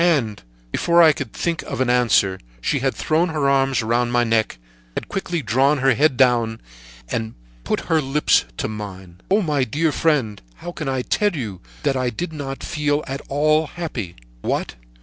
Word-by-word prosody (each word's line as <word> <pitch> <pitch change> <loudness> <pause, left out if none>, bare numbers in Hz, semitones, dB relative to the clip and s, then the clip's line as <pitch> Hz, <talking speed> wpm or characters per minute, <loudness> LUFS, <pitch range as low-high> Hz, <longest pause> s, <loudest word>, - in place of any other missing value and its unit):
"And 130 -12 +1 0.3
before 170 - +4
I 160 -2 +7
could 130 -6 -6
think 170 -1 -2
of - - -6
an 130 - +2
answer, 115 -6 +3 0.2
she - - 0
had - - 0
thrown 165 +3 +1
her 150 -3 0
arms 135 -2 +2
around 120 +2 +1
my 120 0 +3
neck, 115 - +1 0.4
had - - -4
quickly 175 -5 -3
drawn 135 +7 +3
my 135 0 +4
head 140 +2 +2
down, 120 -4 +3 0.5
and 110 - -3 0.3
put - - -1
her 160 -1 +1
lips 140 - +2
to - - -1
mine. 95 -4 -8
"Oh! 200 +2 +3
My 150 -5 +1
dear 150 +6 0
friend, 135 -11 +1 0.2
I 175 - -6
can 135 -6 -2
tell 205 +5 +1
you 105 - -5 0.2
that 135 - +1
I 130 -1 0
did 160 +9 -5
not 135 -3 -5
feel 150 -1 0
at 135 +1 -5
all 155 +2 +2
happy! 130 - -5 0.3
What! - - -2
135 Hz, 180 wpm, -21 LUFS, 115-155 Hz, 0.5 s, I